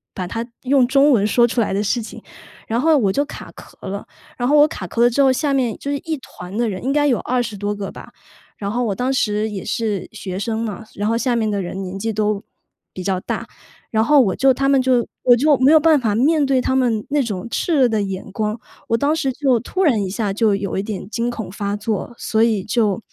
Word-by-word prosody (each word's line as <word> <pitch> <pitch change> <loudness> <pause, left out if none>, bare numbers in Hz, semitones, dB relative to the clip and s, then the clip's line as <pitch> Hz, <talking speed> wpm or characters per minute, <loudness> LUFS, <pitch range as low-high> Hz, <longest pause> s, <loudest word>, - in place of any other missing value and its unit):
把 185 - -3
它 225 +6 -4 0.2
用 260 -1 +3
中 280 +2 +4
文 210 -4 +3
说 240 +2 +4
出 240 0 0
来 210 - 0
的 200 +2 0
事 235 +4 0
情， 220 - -10 0.4
然 230 +2 0
后 320 -1 +4
我 200 -6 +1
就 285 - +1
卡 - - -10
壳 - - -15
了。 200 +1 -5 0.3
然 245 +2 0
后 300 - +5
我 295 +1 +7
卡 185 - -7
壳 235 +6 +1
了 240 - +6
之 280 - +2
后， 265 -1 +5
下 280 +2 0
面 250 -5 0
就 280 - -4
是 285 - -1
一 320 -2 -4
团 195 -6 -10
的 235 -1 +1
人， 190 0 -4
应 270 - 0
该 290 0 +2
有 255 -5 +2
20 240 -4 -2
多 205 +1 -3
个 200 -1 -5
吧， - - -12 0.5
然 200 0 -3
后 245 +2 -1
我 200 -3 -1
当 255 +2 -1
时 210 -3 0
也 195 -3 -5
是 215 -3 -2
学 190 -3 -6
生 220 +1 -2
嘛， 220 0 -5
所 - - -24
然 205 - 0
后 230 - +1
下 245 0 0
面 220 -2 0
的 200 -1 -1
人 185 +2 -5
年 190 +1 -6
纪 225 +2 -1
都 210 -1 -1 0.5
比 185 - -6
较 185 -1 0
大。 - - -4 0.4
然 220 -1 +2
后 295 +4 +5
我 190 -6 +1
就 270 0 +4
他 275 +2 0
们 275 -1 +4
就 255 -2 +2 0.2
我 245 -1 +6
就 290 +4 +4
没 265 +3 +4
有 315 - +7
办 310 -2 +4
法 220 -4 0
面 295 +5 +3
对 265 -1 +2
他 260 - 0
们 235 -5 +1
那 290 0 +2
种 205 -2 -4
炽 335 - -1
热 265 -4 +5
的 220 -2 0
眼 195 0 -5
光。 215 +2 -2 0.3
我 230 - +3
当 290 +5 +1
时 275 -5 -1
就 260 -4 +2
突 375 +11 -2
然 235 - +3
一 190 - -3
下 205 0 -2 0.3
有 200 -2 -3
一 - - +1
点 205 -2 -5
惊 235 +1 -1
恐 220 -6 -5
发 200 0 -3
作， 215 +2 -3
所 220 0 0
以 215 -5 +1
就 215 -3 +1
230 Hz, 270 characters per minute, -20 LUFS, 205-265 Hz, 0.5 s, 我